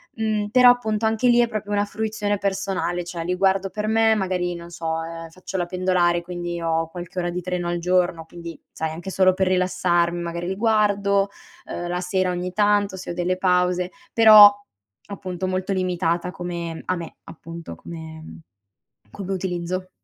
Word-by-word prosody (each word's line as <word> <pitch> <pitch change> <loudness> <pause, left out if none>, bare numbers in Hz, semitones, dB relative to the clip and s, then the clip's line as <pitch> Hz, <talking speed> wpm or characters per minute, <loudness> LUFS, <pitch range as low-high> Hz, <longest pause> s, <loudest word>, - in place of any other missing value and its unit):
mhmm, 215 -2 -1
però 250 +1 +7
appunto 220 -3 -1
anche 220 +3 +2
lì 240 0 +5
è 240 - +4
proprio 210 -2 -5
una 205 0 +1
fruizione 210 -1 -2
personale, 190 -2 -1
cioè 170 -1 -5
li 180 +2 -1
guardo 195 0 +2
per 210 +2 -4
me 225 0 +4
magari 180 -3 -1
non 170 0 -10
so, 165 -1 -3
ehm, 165 0 -7
faccio 185 +2 -7
la 175 - 0
pendolare 180 -1 +1
quindi 175 -1 -5
ho 165 0 0
qualche 175 +1 -7
ora 175 0 -1
di 180 +1 -3
treno 180 -1 -3
al 175 - -1
giorno, 175 -1 +1
quindi 170 -1 -9
sai 160 - -3
anche 175 +5 -7
solo 185 -1 +4
per 190 -1 +1
rilassarm 180 -2 +1
magari 170 0 -4
li 190 - -2
guardo, 200 -2 +2 0.4
uhm, 175 0 -5
la 180 0 -2
sera 185 0 0
ogni 180 +1 -4
tanto 205 -1 +2
se 180 - -6
ho - - -4
delle 180 +1 -1
pause. 180 -1 +1 0.2
Però 215 -2 +10 0.6
appunto 185 -2 -5
molto 185 +1 -1
limitata 180 -1 -1
come 170 -2 -5
a 185 - 0
me 170 -1 -8
appunto, 165 - -9
come 160 - -10 0.7
come 195 - -6
utilizzo, 185 0 -3
180 Hz, 175 wpm, -23 LUFS, 175-200 Hz, 0.7 s, Però